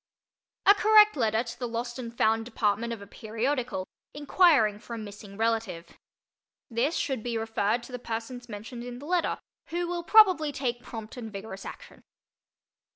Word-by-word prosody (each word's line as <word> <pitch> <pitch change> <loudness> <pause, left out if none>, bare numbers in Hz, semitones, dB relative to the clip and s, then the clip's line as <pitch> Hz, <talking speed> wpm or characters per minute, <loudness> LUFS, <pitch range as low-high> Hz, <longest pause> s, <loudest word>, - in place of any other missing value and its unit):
A 405 - +9
Correct 425 0 +6
Letter 225 -3 +1
to 230 - -9
the 245 - -2
Lost 240 +2 -4
and 235 -2 -5
Found 225 +1 +3
Department 225 -1 0
of 225 -3 -6
a - - -10
Periodical, 230 0 -3 0.3
inquiring 290 - +4
for 235 +1 -7
a - - -6
Missing 205 -2 -9
Relative. 220 -7 -1 0.8
This 255 +8 +1
should 265 -5 -1
be 235 0 -2
referred 225 +1 0
to 245 - -11
the 250 - -5
persons 240 +1 -6
mentioned 230 +3 -7
in 245 0 -7
the 280 - -10
letter 350 +1 0 0.3
who 345 +1 -2
will 350 0 -2
probably 370 -7 +6
take 245 -3 -2
prompt 225 -1 -8
and 225 -3 -6
vigorous 195 -1 -8
action. - - -11
235 Hz, 165 wpm, -28 LUFS, 220-270 Hz, 0.8 s, A